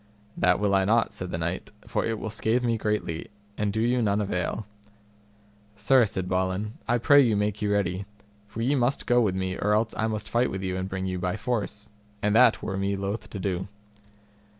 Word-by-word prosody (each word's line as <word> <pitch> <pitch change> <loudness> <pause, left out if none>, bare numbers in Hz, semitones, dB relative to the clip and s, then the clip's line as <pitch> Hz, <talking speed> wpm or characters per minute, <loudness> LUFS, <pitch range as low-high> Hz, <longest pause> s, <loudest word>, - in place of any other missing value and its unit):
That 90 +1 +3
will 100 -1 +1
I 95 0 +4
not, 115 +4 +2
said 90 - -5
the 80 - -3
knight, 85 +2 -3 0.2
for 110 -1 -1
it 115 -1 -1
will 110 - -5
scathe 110 +3 +1
me 115 -1 +1
greatly, 105 -7 -2 0.3
and 105 -1 -1
do 110 - -2
you 120 +2 +2
none 105 -2 +1
avail. 100 +1 -2 1.1
Sir, 130 +2 +4
said 95 -3 -3
Balin, 95 +3 -1
I 120 - +3
pray 145 +4 +6
you 115 -6 +3
make 105 0 -1
you 105 -1 0
ready, 95 -1 0 0.4
for 115 +2 -5
ye 135 +4 +2
must 135 0 +1
go 120 0 +4
with 100 -5 +1
me, 95 0 -2
or 105 +1 +2
else 110 +1 +1
I 110 - 0
must 110 -1 -3
fight 120 +2 +1
with 95 0 -4
you 95 -1 -2
and 95 +1 -3
bring 95 0 -3
you 90 -1 -2
by 90 +3 -1
force, 105 -3 -3 0.3
and 105 +1 +1
that 125 -1 +5
were 95 - -3
me 100 +1 0
loath 100 +3 -4
to - - -7
do. 95 -1 -2
105 Hz, 215 wpm, -26 LUFS, 95-115 Hz, 1.1 s, pray